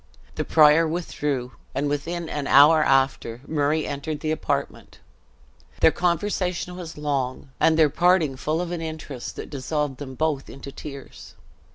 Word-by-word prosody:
The -, -, -2 dB
prior 155 Hz, +1 st, +5 dB
withdrew, 145 Hz, -6 st, -3 dB, 0.2 s
and 145 Hz, +2 st, 0 dB
within 165 Hz, +4 st, -3 dB
an 145 Hz, -3 st, -3 dB
hour 150 Hz, +3 st, +7 dB
after, 135 Hz, -4 st, +1 dB
Murray 150 Hz, 0 st, 0 dB
entered 145 Hz, +1 st, -4 dB
the 155 Hz, -, -1 dB
apartment. 155 Hz, -, -3 dB, 0.8 s
Their -, -, +6 dB
conversation 180 Hz, 0 st, -1 dB
was 170 Hz, -3 st, -8 dB
long, 135 Hz, -3 st, -3 dB
and 160 Hz, -1 st, +4 dB
their 155 Hz, -3 st, +5 dB
parting 170 Hz, -3 st, +3 dB
full 155 Hz, +5 st, -1 dB
of 175 Hz, -1 st, -4 dB
an 175 Hz, -2 st, -3 dB
interest 155 Hz, -5 st, -6 dB
that -, -, -8 dB
dissolved 145 Hz, 0 st, -2 dB
them 130 Hz, -2 st, -8 dB
both 150 Hz, -2 st, -1 dB
into 140 Hz, 0 st, -9 dB
tears. 140 Hz, -1 st, -10 dB
150 Hz, 150 wpm, -24 LUFS, 140-165 Hz, 0.8 s, hour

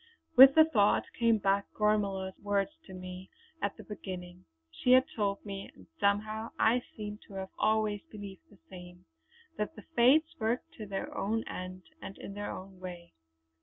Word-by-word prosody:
With 270 Hz, +1 st, +10 dB
the 315 Hz, 0 st, +8 dB
thought 210 Hz, -10 st, +3 dB
came 230 Hz, -1 st, +3 dB
back 200 Hz, 0 st, +1 dB
Gormala's 200 Hz, -3 st, +1 dB
words 205 Hz, +3 st, 0 dB, 0.2 s
to -, -, -10 dB
me 185 Hz, 0 st, -8 dB, 0.3 s
at 200 Hz, -, -2 dB
the -, -, -10 dB
beginning. 180 Hz, -3 st, -8 dB, 0.3 s
She 250 Hz, -, +3 dB
had 255 Hz, +1 st, +7 dB
told 200 Hz, -2 st, -1 dB
me, 195 Hz, -1 st, -6 dB
and -, -, -16 dB
somehow 215 Hz, +2 st, 0 dB
I 235 Hz, +3 st, +4 dB, 0.2 s
seemed 210 Hz, 0 st, -6 dB
to 200 Hz, -, -12 dB
have 190 Hz, 0 st, -5 dB
always 215 Hz, -2 st, +2 dB
believed 205 Hz, +8 st, -10 dB
the -, -, -19 dB
same, 180 Hz, -, -12 dB, 0.5 s
that 210 Hz, +10 st, -2 dB
the -, -, -11 dB
Fates 305 Hz, +7 st, +5 dB
worked 240 Hz, +8 st, -1 dB
to 215 Hz, -, -6 dB
their 195 Hz, -1 st, -4 dB
own 225 Hz, +3 st, -1 dB
end 185 Hz, 0 st, -7 dB, 0.2 s
and 195 Hz, -, -8 dB
in 200 Hz, -, -8 dB
their 205 Hz, 0 st, -4 dB
own 190 Hz, 0 st, -8 dB
way. 175 Hz, -2 st, -9 dB
205 Hz, 170 wpm, -31 LUFS, 190-220 Hz, 0.5 s, With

